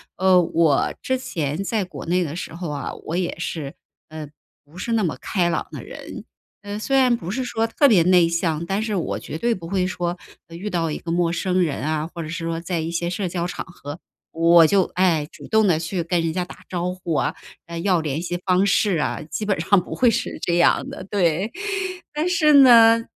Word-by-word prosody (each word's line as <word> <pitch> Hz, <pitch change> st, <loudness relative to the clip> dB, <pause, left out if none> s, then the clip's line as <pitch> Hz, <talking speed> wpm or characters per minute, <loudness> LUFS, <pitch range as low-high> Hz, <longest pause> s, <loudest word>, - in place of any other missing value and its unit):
呃， 185 Hz, -1 st, +4 dB
我 165 Hz, -4 st, +2 dB
之 260 Hz, -2 st, 0 dB
前 160 Hz, -, -3 dB
在 210 Hz, +1 st, -1 dB
国 180 Hz, -, -9 dB
内 180 Hz, +2 st, +2 dB
的 155 Hz, -2 st, -5 dB
时 170 Hz, -, -6 dB
候 175 Hz, -1 st, -5 dB
啊， 145 Hz, -1 st, -4 dB
我 165 Hz, -, -3 dB
也 180 Hz, -2 st, -2 dB
是， 155 Hz, -4 st, -5 dB, 0.3 s
呃， 155 Hz, -1 st, -7 dB, 0.4 s
不 150 Hz, +4 st, -17 dB
是 230 Hz, +5 st, -3 dB
那 225 Hz, -2 st, +2 dB
么 165 Hz, -, -1 dB
开 180 Hz, -4 st, 0 dB
朗 170 Hz, -, -2 dB
的 -, -, -7 dB
人。 -, -, -9 dB, 0.4 s
呃， 205 Hz, +1 st, -5 dB
虽 270 Hz, +5 st, +1 dB
然 255 Hz, -2 st, +4 dB
不 175 Hz, -7 st, -7 dB
是 255 Hz, +5 st, -2 dB
说 225 Hz, -2 st, -1 dB
特 285 Hz, +5 st, +3 dB
别 210 Hz, -9 st, +5 dB
内 180 Hz, -1 st, +5 dB
向， 165 Hz, -1 st, -1 dB
但 195 Hz, +4 st, -1 dB
是 220 Hz, -1 st, -2 dB
我 175 Hz, -, -2 dB
绝 -, -, -7 dB
对 235 Hz, +7 st, +1 dB
不 170 Hz, -5 st, -7 dB
会 185 Hz, 0 st, 0 dB
说， 175 Hz, -1 st, -3 dB, 0.3 s
呃， 165 Hz, -, -11 dB
遇 195 Hz, +5 st, -5 dB
到 170 Hz, -4 st, -1 dB
一 150 Hz, -, -3 dB
个 165 Hz, -, -6 dB
陌 170 Hz, 0 st, +1 dB
生 185 Hz, +1 st, 0 dB
人 155 Hz, -5 st, -1 dB
啊， 155 Hz, +1 st, -1 dB
或 170 Hz, -, -6 dB
者 155 Hz, -, -7 dB
是 165 Hz, 0 st, -4 dB
说 165 Hz, 0 st, -2 dB
在 170 Hz, 0 st, -3 dB
一 160 Hz, +1 st, -3 dB
些 170 Hz, 0 st, -2 dB
社 185 Hz, +2 st, -2 dB
交 170 Hz, 0 st, -2 dB
场 180 Hz, -, -5 dB
合， 155 Hz, -3 st, -9 dB, 0.3 s
我 165 Hz, 0 st, +6 dB
就， 195 Hz, +4 st, +4 dB
哎， 170 Hz, -5 st, +2 dB
主 -, -, -12 dB
动 220 Hz, -1 st, +3 dB
地 170 Hz, -4 st, +3 dB
去 170 Hz, +2 st, -3 dB
跟 170 Hz, +1 st, 0 dB
人 165 Hz, -1 st, -1 dB
家 180 Hz, +1 st, -1 dB
打 -, -, -13 dB
招 180 Hz, 0 st, -2 dB
呼 175 Hz, -3 st, -4 dB
啊， 135 Hz, -, 0 dB, 0.3 s
呃， 170 Hz, 0 st, -6 dB
要 180 Hz, -1 st, +2 dB
联 155 Hz, 0 st, -2 dB
系 175 Hz, 0 st, -3 dB
方 185 Hz, +1 st, +3 dB
式 200 Hz, -2 st, +2 dB
啊， 150 Hz, -, -2 dB
基 155 Hz, +7 st, -5 dB
本 200 Hz, -4 st, 0 dB
上 190 Hz, +3 st, +4 dB
不 -, -, -8 dB
会 250 Hz, -, +4 dB
是 230 Hz, +1 st, -2 dB
这 170 Hz, -, 0 dB
样 170 Hz, -, +3 dB
的， -, -, -8 dB
对。 185 Hz, +1 st, +1 dB, 0.6 s
但 305 Hz, +3 st, -1 dB
是 330 Hz, -4 st, +3 dB
呢， 230 Hz, -4 st, +7 dB
175 Hz, 245 characters per minute, -22 LUFS, 165-200 Hz, 0.6 s, 呢